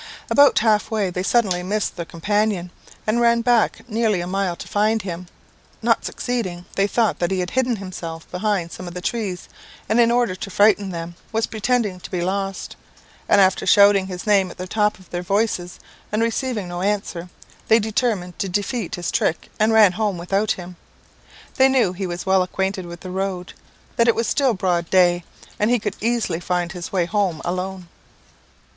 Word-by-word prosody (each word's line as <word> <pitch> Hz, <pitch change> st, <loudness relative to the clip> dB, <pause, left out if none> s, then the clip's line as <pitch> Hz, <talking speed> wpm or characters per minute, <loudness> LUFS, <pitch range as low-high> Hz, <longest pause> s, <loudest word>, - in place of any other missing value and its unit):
"About 285 Hz, 0 st, +6 dB
half 215 Hz, -2 st, +3 dB
way 210 Hz, -4 st, 0 dB
they 180 Hz, -, -3 dB
suddenly 185 Hz, -1 st, +2 dB
missed 205 Hz, +3 st, -2 dB
their 170 Hz, -2 st, -5 dB
companion, 205 Hz, 0 st, -1 dB, 0.3 s
and 220 Hz, +2 st, +1 dB
ran 235 Hz, 0 st, +4 dB
back 240 Hz, 0 st, +1 dB
nearly 220 Hz, -4 st, +1 dB
a 175 Hz, -, -3 dB
mile 185 Hz, -1 st, -1 dB
to -, -, -9 dB
find 215 Hz, +1 st, +1 dB
him; 180 Hz, -1 st, -6 dB, 0.6 s
not -, -, +2 dB
succeeding, 185 Hz, -8 st, -3 dB
they 195 Hz, 0 st, +2 dB
thought 225 Hz, 0 st, +1 dB
that 175 Hz, -, 0 dB
he 190 Hz, -, -1 dB
had 180 Hz, 0 st, -2 dB
hidden 255 Hz, -2 st, +1 dB
himself 175 Hz, -5 st, -7 dB
behind 180 Hz, -2 st, -1 dB
some 185 Hz, +1 st, -8 dB
of 175 Hz, -, -8 dB
the -, -, -3 dB
trees, 200 Hz, -4 st, -3 dB, 0.4 s
and, 220 Hz, +3 st, +2 dB
in 235 Hz, -1 st, +5 dB
order 240 Hz, -4 st, +2 dB
to 185 Hz, +2 st, -6 dB
frighten 205 Hz, +1 st, +3 dB
them, 170 Hz, -1 st, -5 dB, 0.2 s
was 225 Hz, 0 st, +1 dB
pretending 220 Hz, -3 st, -1 dB
to -, -, -10 dB
be 180 Hz, -2 st, -2 dB
lost; 195 Hz, +1 st, -3 dB, 0.5 s
and -, -, +5 dB
after 190 Hz, -1 st, +3 dB
shouting 200 Hz, -2 st, +6 dB
his 180 Hz, -1 st, -6 dB
name 200 Hz, -3 st, +3 dB
at -, -, -11 dB
the 185 Hz, -, -5 dB
top 210 Hz, +2 st, +1 dB
of 185 Hz, -1 st, -18 dB
their 175 Hz, -, -2 dB
voices, 190 Hz, -2 st, -1 dB, 0.3 s
and 215 Hz, +2 st, +1 dB
receiving 230 Hz, -3 st, -1 dB
no 175 Hz, 0 st, -5 dB
answer, 195 Hz, -3 st, -2 dB, 0.4 s
they 220 Hz, -, +6 dB
determined 215 Hz, -5 st, -1 dB
to 195 Hz, -, -1 dB
defeat 205 Hz, +2 st, -2 dB
his 175 Hz, -2 st, -3 dB
trick, 160 Hz, -, -1 dB
and 215 Hz, +1 st, +3 dB
ran 220 Hz, -4 st, +6 dB
home 205 Hz, 0 st, -1 dB
without 195 Hz, +5 st, 0 dB
him. 180 Hz, -1 st, -10 dB, 0.8 s
They 265 Hz, 0 st, +6 dB
knew 250 Hz, -9 st, +2 dB
he 190 Hz, +1 st, -4 dB
was 175 Hz, +1 st, -5 dB
well 190 Hz, 0 st, +4 dB
acquainted 190 Hz, 0 st, -2 dB
with 170 Hz, 0 st, -9 dB
the 185 Hz, -, -7 dB
road, 190 Hz, -1 st, -3 dB, 0.4 s
that 235 Hz, -, +4 dB
it 230 Hz, -, +4 dB
was 230 Hz, -, 0 dB
still 260 Hz, +1 st, +2 dB
broad 175 Hz, -3 st, 0 dB
day, 175 Hz, -2 st, +3 dB, 0.3 s
and 210 Hz, -, +2 dB
he 245 Hz, -, +4 dB
could 210 Hz, -2 st, -4 dB
easily 225 Hz, -7 st, 0 dB
find 175 Hz, -1 st, -1 dB
his 175 Hz, -2 st, -7 dB
way 180 Hz, -3 st, +1 dB
home 190 Hz, -4 st, 0 dB
alone. 185 Hz, +1 st, -3 dB
195 Hz, 190 wpm, -21 LUFS, 180-220 Hz, 0.8 s, About